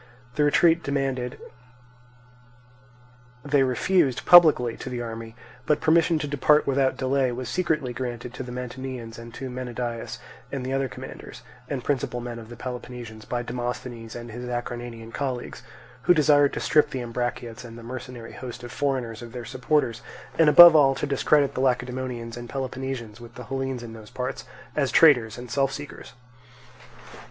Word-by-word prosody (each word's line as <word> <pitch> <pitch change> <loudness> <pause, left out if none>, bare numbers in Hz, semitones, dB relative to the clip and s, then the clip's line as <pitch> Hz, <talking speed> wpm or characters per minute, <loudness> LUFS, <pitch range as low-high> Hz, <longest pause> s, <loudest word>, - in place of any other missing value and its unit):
The 150 - +1
retreat 165 +3 +4
demanded 135 -4 -2 2.1
they 145 -1 +3
refused 135 +2 +2
publicly 155 -9 +7
to - - -7
the 125 -1 -4
army; 115 -1 -6 0.3
but 150 - +3
permission 165 +1 +3
to 150 - -3
depart 145 +1 +3
without 135 -1 +1
delay 130 -1 +1
was 125 +1 -5
secretly 155 -8 -1
granted 120 -1 -5
to - - -6
the 125 -1 -6
Mantineans 125 -2 -6
and 115 0 -10
to 130 -2 -6
Menedaius 120 - -4 0.3
and 135 -2 -4
the 130 - -2
other 135 -1 0
commanders - - -10 0.3
and 135 -4 -3
principal 130 -3 -1
men 120 -1 -6
of 115 -1 -11
the 120 - -9
Peloponnesians 120 -3 -7
by 120 -1 -2
Demosthenes 120 -1 -5
and 120 -1 -7
his 125 +2 -6
Acarnanian 120 -1 -5
colleagues; 130 -3 -4 0.4
who 175 - +6
desired 145 -2 +4
to - - -3
strip 155 -2 +3
the 130 -2 -4
Ambraciots 120 0 -4
and 115 -1 -10
the 115 - -11
mercenary 125 -1 -8
host 125 -1 -8
of 120 - -8
foreigners 130 -6 -2
of 120 -1 -10
their 120 -2 -6
supporters; 125 -1 0 0.3
and, 160 -2 +5
above 170 +2 +11
all, 135 -3 +5
to - - -2
discredit 140 0 +2
the - - -2
Lacedaemonians 125 -2 -2
and 120 0 -8
Peloponnesians 130 -4 -5
with 120 - -12
the 125 - -8
Hellenes 135 0 -3
in 115 -1 -8
those 110 -2 -11
parts, 125 0 -5 0.3
as 140 -3 +1
traitors 125 -9 +5
and 125 0 -9
self 135 -1 +1
seekers. 145 -4 -8
125 Hz, 165 wpm, -25 LUFS, 120-135 Hz, 2.1 s, above